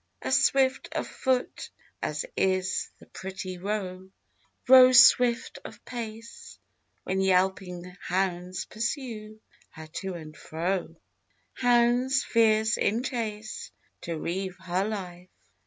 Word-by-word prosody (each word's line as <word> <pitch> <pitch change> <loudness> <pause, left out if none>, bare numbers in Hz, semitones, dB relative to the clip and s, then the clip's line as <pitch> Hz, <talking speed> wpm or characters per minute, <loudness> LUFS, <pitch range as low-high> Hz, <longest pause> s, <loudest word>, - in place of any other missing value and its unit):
As - - +2
swift 265 -1 +2
of - - -2
foot 260 -2 -2 0.3
as - - -2
is 185 0 0
the - - -17
pretty 185 -1 -7
roe, 190 -1 -4 0.6
Roe 255 0 +9
swift 245 -1 +5
of - - -12
pace: 230 -1 -8 0.5
When 190 +1 -1
yelping 185 -1 0
hounds 180 -1 -2
pursue 220 -2 -5 0.3
her 160 - -11
to 180 +4 -6
and 155 -2 -9
fro, 170 +2 -3 0.6
Hounds 245 +2 +3
fierce 220 -1 +3
in 225 +4 +1
chase 220 -4 -4 0.3
To 170 -1 -4
reave 185 +3 -4
her 185 +1 -1
life. 180 -4 -6
195 Hz, 110 wpm, -27 LUFS, 185-235 Hz, 0.6 s, Roe